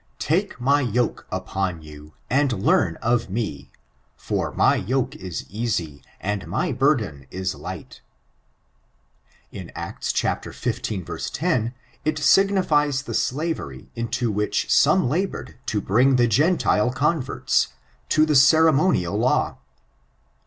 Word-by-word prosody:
Take 180 +1 -1
my 140 +4 +3
yoke 120 -1 -1
upon 90 -4 -3
you, 75 0 -13
and 140 +2 +2
learn 95 -4 +2
of 115 -2 +1
me 90 - -4 0.5
for - - -2
my - - +3
yoke 130 +1 -1
is 90 -3 -6
easy, 95 -9 -3 0.2
and 105 0 -3
my - - -1
burden 110 - 0
is 95 0 -3
light.'^ - - -8 1.5
In - - -8
Acts - - -4
xv. 95 -5 -3
10, 115 0 0 0.3
it 155 +1 0
signifies 150 -4 +3
the - - -6
slavery 130 - -3
into 115 0 -1
which 105 +1 -1
some 155 +2 +4
labored 175 -2 -3
to 105 - 0
bring 125 +8 +3
the 120 -1 +4
Gentile 125 - +2
converts, 145 0 +1 0.4
to 155 0 +4
the 155 -1 +1
ceremonial 155 - +4
law. - - +1
120 Hz, 115 wpm, -23 LUFS, 95-145 Hz, 1.5 s, some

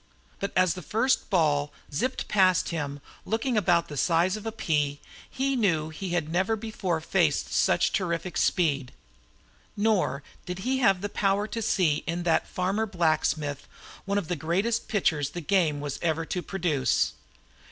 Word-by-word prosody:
But 200 - -2
as 185 -3 +4
the 180 - -7
first 225 +9 +1
ball 150 -6 +2 0.2
zipped 255 - -1
past 185 -3 +3
him, 145 -4 -4 0.2
looking 230 +4 -1
about 175 -5 +3
the 145 - -7
size 170 +5 +2
of 215 +1 -6
a - - -1
pea, 150 -9 -1 0.3
he 270 +1 -1
knew 165 -10 +1
he 180 +4 -6
had 175 -3 0
never 190 +7 +1
before 205 -6 -2
faced 160 - +1
such - - +2
terrific 175 -2 -2
speed. 140 -8 +1 0.8
Nor 205 -10 +1 0.2
did 180 +1 -4
he 260 +1 +1
have 195 -5 +3
power 200 +1 +1
to 230 - -3
see 185 -8 +2
in 170 +1 -2
that 170 -2 +2
farmer 195 +5 -1
blacksmith 155 -5 0 0.4
one 200 0 0
of 200 -6 -2
the 180 - -1
greatest 185 +9 -1
pitchers 155 - +1
the 175 - -6
game 160 -4 +2
was 145 -2 -4
ever 165 -1 0
to 180 - -3
produce. 160 -10 0
180 Hz, 160 wpm, -27 LUFS, 155-205 Hz, 0.8 s, as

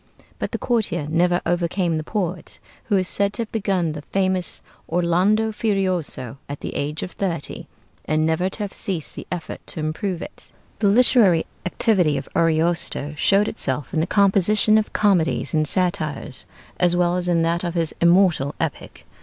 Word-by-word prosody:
But - - -3
the - - -2
courtier 195 - -1
never 175 +1 +2
overcame 175 0 0
the 155 - -3
poet, 180 -2 -4 0.3
who 205 - +2
is 185 -1 0
said 200 +1 0
to 235 - -2
have 220 - -12
begun 195 -6 0
the 150 -1 -6
famous 185 +2 -1 0.3
'Orlando 180 +6 +2
Furioso' 185 - -2
at 145 - -6
the - - -5
age 150 +2 -3
of 180 - -6
thirty, 170 -6 -4 0.4
and 155 0 +1
never 160 +4 +1
to 210 - -5
have 200 - -5
ceased 175 -6 -3
the - - -9
effort 175 -3 -5
to - - -6
improve 165 +4 -3
it. - - -12 0.3
The 205 - +2
literary 205 -5 +5 0.2
activity 180 -6 +2
of - - -5
Ariosto 165 -2 +1
showed 200 +6 +3
itself 135 - -2
in 160 - +1
the 160 - 0
composition 205 +2 +5
of 215 - -4
comedies 185 -7 +1
and 155 -1 +2
satires, 155 -7 -1 0.3
as 175 -1 +3
well 175 0 +2
as 180 0 -1
in 170 -1 +2
that 170 +1 0
of 175 -1 -3
his 165 -2 0
immortal 170 -5 +3
epic. 160 -3 -5
175 Hz, 170 wpm, -22 LUFS, 160-195 Hz, 0.4 s, literary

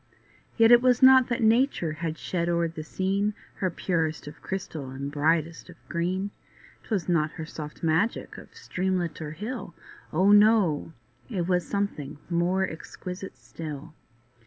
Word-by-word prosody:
Yet 225 0 +6
it 240 0 +8
was 250 0 +3
not 260 -1 +8
that 240 -1 -1
nature 225 - +3
had 160 +1 -4
shed 170 -2 -2
o'er 170 0 +2
the 160 -1 -7
scene 195 +5 -1 0.2
Her 185 - 0
purest 165 -3 -1
of 150 - -10
crystal 180 -8 -5
and 135 +2 -5
brightest 160 +3 0
of 180 - -11
green; 185 +4 -1 0.5
'Twas 205 -6 -2
not 160 -3 +1
her 160 - -6
soft 150 -1 -8
magic 165 +8 0
of - - -14
streamlet 185 - -2
or 150 -1 -5
hill, 215 0 -6 0.4
Oh! 190 +6 +4
no—it 175 - +2
was 180 -2 +1
something 160 -8 -3
more 180 +3 +1
exquisite 180 +1 -8
still. 150 +4 -8
175 Hz, 145 wpm, -27 LUFS, 155-200 Hz, 0.5 s, it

